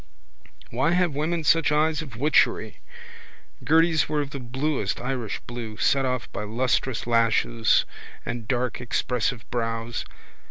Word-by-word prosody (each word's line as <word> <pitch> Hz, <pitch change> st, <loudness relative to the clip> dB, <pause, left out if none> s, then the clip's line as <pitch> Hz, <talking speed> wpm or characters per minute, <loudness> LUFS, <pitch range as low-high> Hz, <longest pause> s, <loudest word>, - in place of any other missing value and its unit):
Why 130 Hz, +8 st, +1 dB
have 175 Hz, -3 st, +2 dB
women 160 Hz, +3 st, -1 dB
such 165 Hz, 0 st, +4 dB
eyes 155 Hz, +1 st, +2 dB
of 135 Hz, -7 st, -9 dB
witchery? 145 Hz, +6 st, +2 dB, 0.8 s
Gerty's 160 Hz, -1 st, +3 dB
were 150 Hz, -1 st, 0 dB
of 145 Hz, -1 st, -3 dB
the 140 Hz, -, -5 dB
bluest 130 Hz, -3 st, -2 dB
Irish 125 Hz, -4 st, -3 dB
blue, 115 Hz, -3 st, -7 dB
set 135 Hz, +6 st, +2 dB
off 125 Hz, -2 st, -1 dB
by 95 Hz, -, -4 dB
lustrous 125 Hz, +2 st, 0 dB
lashes 115 Hz, -1 st, +3 dB, 0.4 s
and 115 Hz, -2 st, -4 dB
dark 125 Hz, 0 st, -1 dB
expressive 125 Hz, -1 st, -1 dB
brows. 115 Hz, -1 st, -2 dB
125 Hz, 130 wpm, -25 LUFS, 115-150 Hz, 0.8 s, such